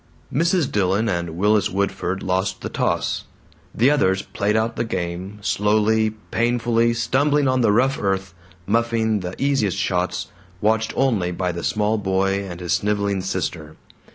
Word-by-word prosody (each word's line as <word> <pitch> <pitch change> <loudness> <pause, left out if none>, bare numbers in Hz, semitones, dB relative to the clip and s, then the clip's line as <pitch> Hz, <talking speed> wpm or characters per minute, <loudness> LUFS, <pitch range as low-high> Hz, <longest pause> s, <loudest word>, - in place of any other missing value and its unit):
Mrs. 170 0 +2
Dillon 100 +2 +1
and 85 -4 -2
Willis 105 +2 +3
Woodford 95 -1 -2
lost 95 +1 -1
the - - -4
toss. - - -1 0.5
The 125 +6 +3
others 95 -10 +2
played 105 +1 -1
out 110 +1 0
the - - -1
game, 90 -1 -4
slowly, 110 +1 +2 0.2
painfully, 115 0 +2
stumbling 145 +4 +2
on 130 0 +2
the 115 -3 +4
rough 130 +6 +2
earth, 95 -2 -1 0.3
muffing 115 0 +1
the 90 0 -5
easiest 135 -9 +1
shots, 90 -2 -1 0.3
watched 110 +2 +1
only 115 -10 +1
by 90 0 -1
the 85 0 -6
small 110 +1 +1
boy 95 0 0
and 90 -2 -7
his 85 -3 -1
sniveling 100 +1 0
sister. 85 -4 -4
105 Hz, 150 wpm, -22 LUFS, 95-115 Hz, 0.5 s, the